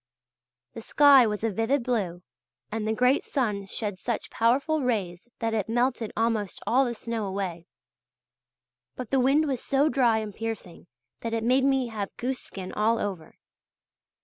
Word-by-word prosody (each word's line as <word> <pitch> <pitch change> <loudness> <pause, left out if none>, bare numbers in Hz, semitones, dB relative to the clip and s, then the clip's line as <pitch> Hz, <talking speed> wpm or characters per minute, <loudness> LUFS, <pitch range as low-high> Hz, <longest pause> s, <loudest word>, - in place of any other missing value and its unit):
The - - -7
sky 275 0 +6
was 210 0 -3
a 225 - +1
vivid 225 +6 0
blue 190 -8 -2 0.5
and 215 0 -2
the - - +1
great 250 +4 +3
sun 210 -7 -2
shed 205 -2 -4
such 235 -2 -3
powerful 280 +7 +2
rays 205 -6 -2
that 225 -1 -2
it 220 -1 -1
melted 240 -1 0
almost 225 -3 0
all 265 +3 +3
the 240 -1 -3
snow 225 -2 -3
away. 185 -3 -4 1.3
But 250 -4 -7
the 270 - +3
wind 275 +5 +3
was 265 -4 -2
so 280 +2 +2
dry 245 -6 +3
and 215 -2 -4
piercing 220 -6 -6 0.3
that 230 0 -3
it 225 - -2
made 260 +3 +3
me 265 -3 +2
have 210 -3 -5
goose 255 +1 -2
skin 185 -1 -8
all 225 +2 +2
over. 190 -7 -5
225 Hz, 165 wpm, -26 LUFS, 210-255 Hz, 1.3 s, sky